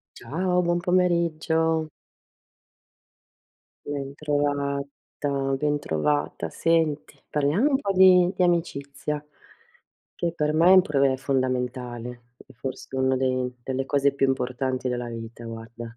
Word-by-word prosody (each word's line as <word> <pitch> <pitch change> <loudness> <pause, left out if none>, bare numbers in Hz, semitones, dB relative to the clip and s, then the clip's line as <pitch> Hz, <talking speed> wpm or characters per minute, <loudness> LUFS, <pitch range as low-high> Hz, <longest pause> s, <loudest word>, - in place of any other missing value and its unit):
Ciao, 180 +7 0
buon 175 0 +1
pomeriggio. 165 -3 +1 2.0
Bentrovata, 145 0 -3 0.3
bentrovata. 145 - -1
Senti, 160 -3 0
parliamo 150 - +2
un 270 -2 +2
po' 200 -8 -1
di 185 -1 +6
di 185 - +2
amicizia 150 -4 -1 0.9
che 170 -1 -2
per 150 -2 0
me 165 +3 +4
è - - +9
un 185 - +8
problema 140 -4 +2
fondamentale 125 -2 -2 0.2
e - - -17
forse 130 +2 -6
una 130 0 +2
de 130 -1 0
delle 130 +1 -3
cose 140 0 +2
più 140 0 +1
importanti 130 0 -1
della 120 -1 -3
vita, 115 0 -8
guarda. 115 0 -8
140 Hz, 115 wpm, -25 LUFS, 130-165 Hz, 2.0 s, è